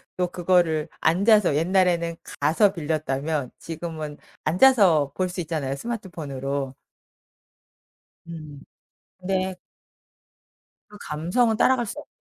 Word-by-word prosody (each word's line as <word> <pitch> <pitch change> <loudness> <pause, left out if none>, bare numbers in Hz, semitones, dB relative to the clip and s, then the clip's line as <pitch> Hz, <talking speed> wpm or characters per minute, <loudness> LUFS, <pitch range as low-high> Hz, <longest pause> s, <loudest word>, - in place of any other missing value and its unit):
또 180 -1 0
그거를 170 -3 +1
앉아서 195 0 +4
옛날에는 170 0 +2 0.2
가서 165 +8 +3
빌렸다면 150 -4 -2
지금은 160 -2 -6 0.3
앉아서 175 - +5
볼 185 - 0
수 180 0 -4
있잖아요, 150 -5 -3
스마트폰으로. 140 - -4 1.5
음. 155 -4 -9 0.6
근데 185 0 -1 1.3
그 210 - -13
감성은 200 +10 0
따라갈 250 +2 +3
수 230 - -6
없어 295 - -12
170 Hz, 235 characters per minute, -24 LUFS, 150-190 Hz, 1.5 s, 앉아서